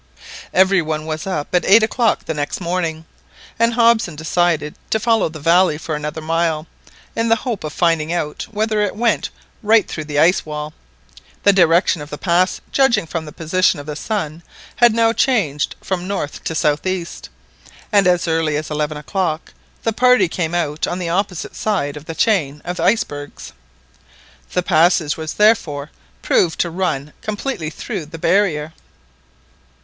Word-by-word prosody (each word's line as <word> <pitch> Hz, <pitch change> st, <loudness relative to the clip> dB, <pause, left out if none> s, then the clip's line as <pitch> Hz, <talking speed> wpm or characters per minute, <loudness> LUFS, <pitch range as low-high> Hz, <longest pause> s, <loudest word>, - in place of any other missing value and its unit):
Every 190 Hz, 0 st, +4 dB
one 155 Hz, -1 st, -3 dB
was 155 Hz, +2 st, -4 dB
up 165 Hz, -5 st, -3 dB
at 180 Hz, -2 st, +3 dB
eight 215 Hz, +3 st, +6 dB
o'clock 225 Hz, 0 st, +1 dB
the -, -, -2 dB
next 145 Hz, -1 st, -3 dB
morning, 170 Hz, -3 st, -2 dB, 0.5 s
and 230 Hz, 0 st, +2 dB
Hobson 230 Hz, -7 st, +3 dB
decided 160 Hz, -1 st, 0 dB, 0.2 s
to 220 Hz, -, +1 dB
follow 225 Hz, -4 st, +2 dB
the 155 Hz, 0 st, -9 dB
valley 170 Hz, +1 st, +3 dB
for 160 Hz, 0 st, -5 dB
another 150 Hz, +1 st, -4 dB
mile, 165 Hz, -1 st, 0 dB, 0.5 s
in 230 Hz, 0 st, 0 dB
the 225 Hz, -, +5 dB
hope 230 Hz, -2 st, -4 dB
of 155 Hz, -, -4 dB
finding 165 Hz, -1 st, +1 dB
out 150 Hz, -4 st, -3 dB
whether 215 Hz, 0 st, 0 dB
it 205 Hz, -2 st, -1 dB
went 235 Hz, +1 st, +1 dB, 0.3 s
right 220 Hz, -1 st, +4 dB
through 155 Hz, -, -5 dB
the 150 Hz, -1 st, -4 dB
ice 165 Hz, +5 st, +4 dB
wall. 150 Hz, 0 st, -6 dB, 0.7 s
The 200 Hz, -, +6 dB
direction 170 Hz, -2 st, +3 dB
of 145 Hz, -, -8 dB
the 150 Hz, -, -6 dB
pass, 180 Hz, +2 st, +1 dB
judging 235 Hz, -9 st, +3 dB
from 165 Hz, 0 st, -4 dB
the 150 Hz, -, -9 dB
position 170 Hz, +2 st, +1 dB
of 145 Hz, -, -8 dB
the 150 Hz, 0 st, -5 dB
sun, 160 Hz, -3 st, -3 dB, 0.4 s
had 240 Hz, -1 st, +6 dB
now 230 Hz, 0 st, +3 dB
changed 190 Hz, -, +1 dB
from 185 Hz, -1 st, -3 dB
north 195 Hz, -7 st, -4 dB
to 160 Hz, -, -2 dB
south 150 Hz, +2 st, +1 dB
east, 185 Hz, -2 st, -4 dB, 0.6 s
and 200 Hz, -3 st, +4 dB
as 180 Hz, -1 st, +2 dB
early 160 Hz, -2 st, +1 dB
as 155 Hz, +1 st, -5 dB
eleven 150 Hz, 0 st, -2 dB
o'clock 165 Hz, +1 st, -3 dB, 0.3 s
the 225 Hz, -, 0 dB
party 250 Hz, -4 st, +4 dB
came 170 Hz, 0 st, -2 dB
out 155 Hz, -3 st, -1 dB
on 175 Hz, -, -3 dB
the 175 Hz, -2 st, -3 dB
opposite 180 Hz, -1 st, -2 dB
side 170 Hz, -10 st, -1 dB
of 150 Hz, 0 st, -9 dB
the 165 Hz, -, -6 dB
chain 155 Hz, -11 st, +1 dB
of 175 Hz, +1 st, -4 dB
icebergs. 145 Hz, -11 st, -1 dB, 1.0 s
The 180 Hz, -, +1 dB
passage 165 Hz, -3 st, +3 dB
was 160 Hz, -1 st, -5 dB
therefore 165 Hz, -9 st, +2 dB, 0.3 s
proved 170 Hz, -2 st, +2 dB
to 170 Hz, -, -1 dB
run 155 Hz, -5 st, -2 dB
completely 210 Hz, -, -3 dB
through 180 Hz, -1 st, -6 dB
the 165 Hz, -, -9 dB
barrier. 160 Hz, -4 st, +1 dB
170 Hz, 170 wpm, -19 LUFS, 155-200 Hz, 1.0 s, eight